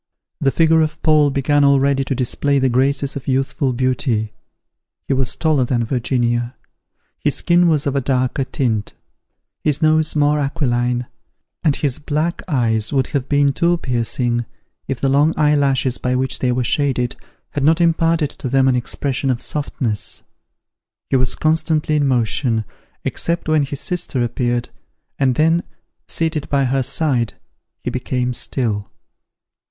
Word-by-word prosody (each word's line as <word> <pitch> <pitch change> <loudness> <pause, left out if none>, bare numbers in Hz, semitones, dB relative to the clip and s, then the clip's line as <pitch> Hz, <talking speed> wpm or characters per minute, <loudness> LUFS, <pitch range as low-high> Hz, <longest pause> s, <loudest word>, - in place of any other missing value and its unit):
The 135 - +2
figure 160 +2 +3
of 155 -1 -1
Paul 155 -2 +4
began 140 +1 +2
already 140 0 +3
to 135 - -2
display 140 +3 0
the 135 -1 +2
graces 135 +3 +1
of 135 - -7
youthful 135 +1 0
beauty. 120 -3 -1 0.7
He - - +1
was 130 -1 0
taller 155 -5 +2
than 120 -1 0
Virginia: 120 0 -1 0.6
his - - 0
skin 175 0 +3
was 155 -4 +2
of 140 -1 -1
a 140 - +1
darker 130 +1 0
tint; 110 -6 -2 0.7
his 150 -2 +1
nose 155 -1 +3
more 150 0 +3
aquiline; 125 -4 0 0.6
and 150 -3 +3
his 140 -5 -1
black 155 +3 -2
eyes 115 - +1
would 135 -2 +1
have 140 -2 -1
been 145 -1 +3
too 170 +4 +2
piercing, 120 -3 -1 0.4
if 130 -2 -3
the 135 - +1
long 145 +4 +3
eye 150 -1 +3
lashes 135 -3 +1
by 125 0 -1
which 130 +1 0
they 125 - +1
were 125 0 0
shaded, 125 -1 0 0.4
had 145 - -2
not 160 +3 +4
imparted 165 -2 +2
to 130 - -6
them 135 +1 +3
an 130 - +3
expression 135 +2 -2
of 125 -2 0
softness. 125 -6 -3 0.9
He - - +3
was 130 -1 +2
constantly 155 -1 +1
in 145 -2 +2
motion, 120 -2 +1 0.4
except 170 -1 -2
when 155 -1 +3
his 140 0 -3
sister 175 -8 -2
appeared, 120 0 -1 0.5
and 130 -3 +2
then, 165 +4 +3 0.5
seated 160 -3 -1
by 140 -1 +2
her 135 +1 +1
side, 130 -3 0 0.5
he - - -2
became 125 -1 -2
still. 110 -5 -2
135 Hz, 155 wpm, -19 LUFS, 125-150 Hz, 0.9 s, Paul